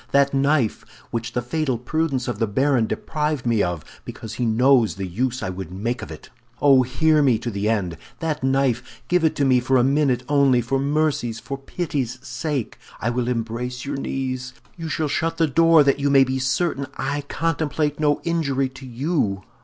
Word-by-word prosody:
That 140 0 +3
knife, 140 -4 +1 0.3
which 115 0 -3
the 125 - -1
fatal 135 0 -1
prudence 135 +1 -1
of 120 - -3
the 115 - +1
baron 130 +2 +2
deprived 150 +5 -2
me 115 -3 +2
of, 85 -4 -2 0.2
because 110 -1 -8
he 120 +1 -1
knows 120 0 +4
the 95 -1 -4
use 125 +8 -2
I 95 - -2
would 90 -2 -7
make 115 +6 -3
of - - -7
it! - - -11 0.3
Oh, 140 -2 +6
hear 150 +5 +2
me 130 -5 +4
to 120 +2 -4
the 100 +1 -1
end! 95 -7 -1 0.2
that 160 -4 -3
knife, 130 -2 0
give 180 -1 +3
it 160 - +2
to 140 - +1
me 130 -2 +4
for 130 +2 +2
a 125 - +4
minute 135 -1 +2
only, 140 -3 +4
for 125 +3 0
mercy's, 140 -5 0
for 135 - -5
pity's 135 -3 -3
sake! 130 0 -3 0.2
I 120 - 0
will 120 0 -1
embrace 125 +1 -3
your 140 0 -3
knees! 130 -2 -3 0.2
You 165 -2 -6
shall 155 -1 -1
shut 165 +3 -1
the 165 - +4
door 165 +1 +5
that 140 0 +2
you 140 0 +1
may 135 -1 +6
be 130 0 -1
certain 140 +2 0
I 145 +2 -2
contemplate 155 -2 -1
no 150 -1 +2
injury 140 -6 0
to 130 +1 -11
you! 120 - -1
130 Hz, 195 wpm, -22 LUFS, 120-145 Hz, 0.3 s, Oh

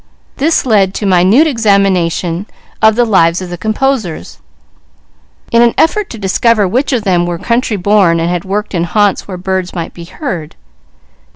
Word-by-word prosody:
This 310 +2 +1
led 200 -5 +2
to 210 - -3
minute 190 - +4
examination 195 - 0 0.3
of 220 0 +4
the 240 +1 +2
lives 175 -6 +2
of 185 -2 -7
the - - -4
composers, 220 -2 -2 1.1
in 235 - +4
an 235 -1 +3
effort 405 +5 +1
to 230 - -8
discover 210 +1 +1
which 255 +10 -1
of 245 -5 0
them 175 -3 +1
were 175 -1 -3
country 235 +2 -1
born 190 -3 +2
and 165 - -1
had 175 -1 -2
worked 205 +2 -3
in 170 -2 0
haunts 205 +2 0
where 185 -2 -6
birds 185 0 -3
might 170 -2 -5
be 170 - -10
heard. 170 - -6
195 Hz, 170 wpm, -12 LUFS, 175-230 Hz, 1.1 s, minute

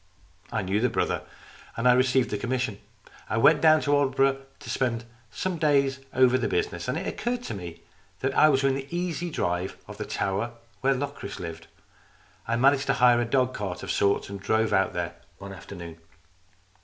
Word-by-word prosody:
I 110 - -1
knew 95 +3 0
the 125 - +3
brother, - - -1 0.6
and 115 +2 +1
I 125 - +7
received 130 0 +2
the 105 - -1
commission. 120 -3 -2 0.5
I 110 - 0
went 150 +7 +5
down 155 -1 +6
to 145 - +1
Aldeburgh 135 -1 +3 0.2
to - - -12
spend 120 -3 -1 0.3
some 180 +6 -3
days 140 -3 +2
over 130 0 +4
the - - 0
business, 430 0 -2
and - - -1
it - - -4
occurred 240 0 -2
to - - -5
me 85 -4 -8 0.4
that 135 +1 0
I 155 - +6
was 135 -2 +2
within 135 0 +2
an 135 - -8
easy 175 -1 -2
drive 90 - -2
of - - -10
the - - -3
tower 100 +5 -2 0.3
where 135 +1 +2
Locris 140 -7 -5
lived. 85 -1 -7 0.8
I 115 - +1
managed 135 +3 +3
to - - +3
hire 120 -1 +5
a - - 0
dog 130 +1 +1
cart 95 -5 -5
of 95 - -3
sorts, 100 +1 +1
and 100 0 -7
drove 110 +2 +1
out 95 -1 +2
there 85 0 -3 0.2
one 100 0 -9
afternoon. 85 -3 -9
125 Hz, 190 wpm, -26 LUFS, 100-140 Hz, 0.8 s, I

